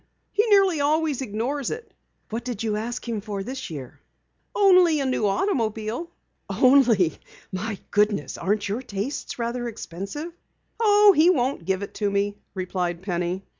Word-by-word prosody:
He 420 - +3
nearly 390 -7 +4
always 300 -1 +1
ignores 250 +4 -2
it." 460 +1 -7 0.4
"What 225 +2 -3
did 240 -4 -4
you 215 -2 0
ask 235 +3 -4
him 225 -3 -2
for 200 -2 -4
this 260 +4 -6
year?" 140 -6 -8 0.6
"Only 365 -6 +5
a 275 - 0
new 255 -5 +1
automobile." 225 - -1 0.4
"Only! 245 - +4 0.3
My 205 +3 -3
goodness, 205 -9 +1
aren't 205 +2 -1
your 210 +5 -2
tastes 240 +2 -4
rather 240 0 -2
expensive?" 230 - -6 0.5
"Oh, 415 -2 +6
he 315 +4 +6
won't 260 - +1
give 190 +2 0
it - - -7
to 205 - +2
me," 200 +1 -1 0.2
replied 180 -2 -2
Penny. 180 0 -2
230 Hz, 150 wpm, -24 LUFS, 200-285 Hz, 0.6 s, Oh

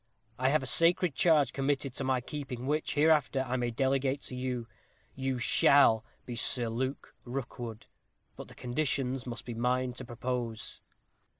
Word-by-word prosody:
I 130 +1 +3
have 150 0 +2
a - - -4
sacred 165 +4 +3
charge 155 -2 +3
committed 135 -1 -1
to 135 - -3
my 130 -1 +1
keeping, 130 -2 -6
which, 150 +3 -1
hereafter, 145 -3 +3
I 125 - -1
may 120 -1 0
delegate 135 +3 0
to 125 - -6
you. 125 -2 -3 0.5
You 130 -1 -2
shall 120 -2 +5 0.2
be 120 - -5
Sir 120 0 +1
Luke 130 +4 -3
Rookwood, 120 -3 -6 0.5
but - - -9
the - - -14
conditions 130 -1 -1
must 120 - -6
be 120 - -5
mine 125 +2 0
to 125 - -7
propose." 120 -2 -4
130 Hz, 160 wpm, -31 LUFS, 120-140 Hz, 0.5 s, shall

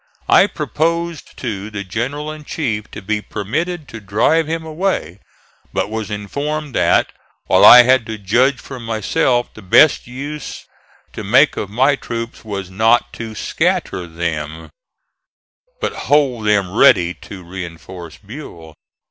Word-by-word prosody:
I - - +6
proposed 170 0 -2
to 105 -4 -4
the 100 -2 -5
general 130 +10 -4
in 155 0 -9
chief 115 -9 -3
to - - -9
be 105 +2 -1
permitted 150 - -3
to 110 - -8
drive 115 +11 +1
him 165 0 -3
away, 155 - -2 0.5
but 105 - -1
was 110 -1 -4
informed 140 +8 -4
that, 90 -5 +2 0.3
while - - +4
I 125 0 +11
had 130 -2 +3
to 110 0 -5
judge 120 +7 +2
for 130 -2 -9
myself, 115 +2 0
the 110 - -12
best 115 +11 +4
use 145 +4 -7 0.5
to - - -6
make - - +4
of 100 - -4
my 130 +7 +3
troops 115 -3 -6
WAS 100 -4 -6
NOT 110 +5 +2
TO 110 -1 -7
SCATTER 90 -3 -1
THEM, 80 -2 -4 1.1
but - - -2 0.2
hold 135 -7 +2
them 100 -2 +1
ready 90 -10 +5
to 95 0 -11
reinforce 85 -1 -9
Buell. 100 - -11
110 Hz, 140 wpm, -18 LUFS, 95-140 Hz, 1.1 s, I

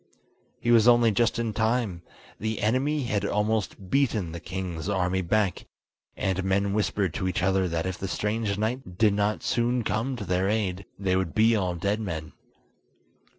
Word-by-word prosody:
He 120 - +1
was 115 -1 +6
only 120 -2 +6
just 115 +2 +1
in 115 -2 -1
time: 110 -5 0 0.4
the 110 +1 -2
enemy 135 +7 +1
had 105 -4 -1
almost 105 -2 -1
beaten 110 -11 +1
the 85 - -6
king's 90 0 -5
army 95 -1 +1
back, 95 +2 0 0.5
and 95 0 -1
men 100 +1 +1
whispered 100 -4 0
to 95 - -2
each 90 -1 -1
other 95 0 +2
that 85 0 -2
if 95 -1 -3
the 95 - -3
strange 105 +1 -1
knight 110 -4 -3
did 105 -1 +4
not 105 +1 0
soon 120 +1 +1
come 115 +5 -1
to 120 - -6
their 90 +1 +1
aid, 100 -3 -1
they 95 -2 0
would 95 -3 -1
be 115 +1 +5
all 90 -4 0
dead 100 +5 -1
men. 80 -8 -5
100 Hz, 175 wpm, -26 LUFS, 95-110 Hz, 0.5 s, was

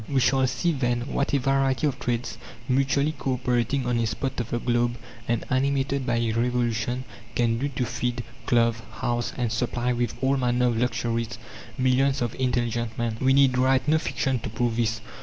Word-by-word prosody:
We 135 - +2
shall 130 +1 +3
see 170 +6 0
then 120 -5 0
what 140 - 0
a 140 - +3
variety 135 +1 +1
of 145 - -1
trades, 120 -1 -2 0.3
mutually 135 +3 +2
cooperating 125 -2 -1
on 120 -1 +1
a 115 - +1
spot 130 +4 -3
of 120 -1 -3
the 120 - -1
globe 120 0 0 0.3
and 120 -1 0
animated 135 0 +1
by 120 0 +1
a 115 -1 +1
revolution, 120 +1 0 0.3
can 115 -1 +2
do 140 +3 -1
to 125 -2 -2
feed, 120 +1 -2 0.2
clothe, 115 -1 +3 0.2
house, 120 0 -1
and 120 -3 0
supply 120 +1 0
with 120 -2 -1
all 135 +1 +2
manner 125 -1 +2
of 115 - -1
luxuries 115 -2 -1 0.4
millions 130 +1 +2
of 120 -2 -1
intelligent 120 -3 -1
men. 115 -2 -1
We 130 0 +4
need 135 -2 +4
write 130 +1 +3
no 155 +1 +4
fiction 130 -3 -1
to - - -5
prove 115 +1 -1
this. 115 -1 0
125 Hz, 185 wpm, -25 LUFS, 120-135 Hz, 0.4 s, We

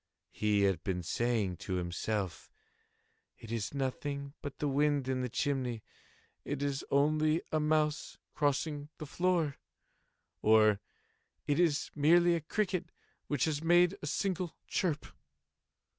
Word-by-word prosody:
He 105 -1 +1
had 95 -4 +1
been 90 -2 -2
saying 110 -2 0
to 95 - -5
himself—"It 90 +4 -6
is 115 +3 -3
nothing 140 +1 -3
but 145 -2 -6
the 150 - -1
wind 145 -1 +1
in 130 -1 0
the 125 - -2
chimney—it 135 +2 -4
is 140 -1 -1
only 155 +3 +2
a 155 - +2
mouse 150 0 0 0.2
crossing 145 +1 -1
the 155 - -6
floor," 170 -2 0 0.8
or 110 -1 +5 0.7
"It 145 +2 +1
is 160 -5 +2
merely 170 +4 +5
a 170 - 0
cricket 180 0 -1 0.4
which 145 -4 +1
has 155 -1 -2
made 175 +2 +5
a 145 - -4
single 180 +1 -1
chirp." 160 -5 -1
145 Hz, 125 wpm, -32 LUFS, 115-155 Hz, 0.8 s, or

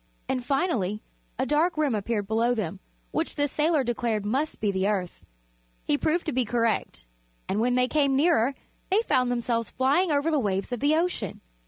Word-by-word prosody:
And, 255 -1 -1
finally, 240 - 0 0.3
a 260 - 0
dark 305 +5 +1
rim 300 -5 +1
appeared 210 0 -1
below 230 +4 +1
them, 195 -4 -3 0.3
which 320 - -2
the 290 -1 +1
sailor 300 +1 +1
declared 235 -3 -1
must 270 +9 -1
be 210 -2 +1
the 190 0 0
Earth. 190 -4 -2 0.6
He - - +2
proved 315 - 0
to 315 - -1
be 255 0 +1
correct 230 - -1 0.4
and 200 - -1
when 245 +2 +2
they 250 0 +3
came 280 -1 +2
nearer 275 -4 +3 0.3
they 405 +4 +3
found 250 - +2
themselves 235 -2 -1
flying 285 +7 +2
over 290 +2 +1
the 305 - +2
waves 200 -2 -1
of 245 - -2
the 290 +4 +3
ocean. 325 - -1
250 Hz, 185 wpm, -26 LUFS, 215-300 Hz, 0.6 s, they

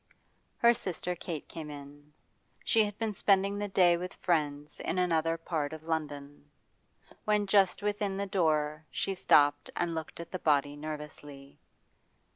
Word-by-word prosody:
Her 235 0 +6
sister 180 -4 -3
Kate 165 -3 -6
came 155 -2 -7
in. 145 0 -11 0.5
She 225 -2 +4
had 205 0 -6
been 220 -2 -1
spending 200 +1 +2
the 205 - -2
day 180 -3 +4
with 180 +2 -6
friends 150 -4 -1
in 175 - -2
another 165 -2 +1
part 160 -3 -3
of 160 0 -8
London. 145 -3 -4 0.7
When 210 -1 +2
just 195 -1 +3
within 205 -1 -1
the 200 - -1
door 155 -5 +1
she 195 - -2
stopped 145 -5 +4
and 170 -1 -1
looked 160 0 -6
at 170 - -8
the 185 - -4
body 145 -2 +2
nervously. 145 -2 -8
165 Hz, 150 wpm, -30 LUFS, 150-195 Hz, 0.7 s, Her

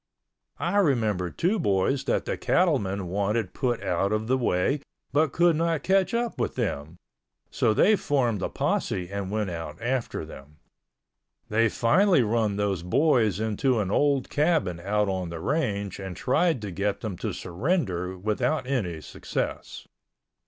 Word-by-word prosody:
I 175 +4 -1
remember 110 - +2
two 190 - 0
boys 130 - +1
that - - 0
the - - -1
cattlemen 100 - +1
wanted 100 +3 -1
put 120 -3 -1
out 95 +3 0
of 110 0 0
the 130 +3 +2
way 120 +2 +1 0.3
but 150 0 +3
could 170 -1 +3
not 165 -2 0
catch 195 +3 +2
up 235 -1 -2
with - - -1
them, 75 +4 -3 0.5
so - - +2
they 210 - +5
formed 125 - 0
a - - -1
posse 90 0 -1
and 100 -1 -3
went 105 -2 -1
out 80 -2 -6
after 125 +1 -2
them. 75 +3 -13 0.9
They 115 +1 +3
finally 170 - +3
run 110 -2 +1
those 100 -3 -1
boys 110 - +2
into 110 +4 +1
an 100 -2 -1
old 140 +1 +1
cabin 150 - +1
out 105 +3 0
on 95 -2 -2
the 85 -1 -6
range 100 - -1
and 95 -3 -6
tried 140 -1 +1
to 100 - -4
get 100 +3 -2
them 110 -5 -4
to - - -2
surrender 95 - -2
without 110 +9 -1
any 100 - -2
success. - - -5
110 Hz, 155 wpm, -26 LUFS, 95-145 Hz, 0.9 s, they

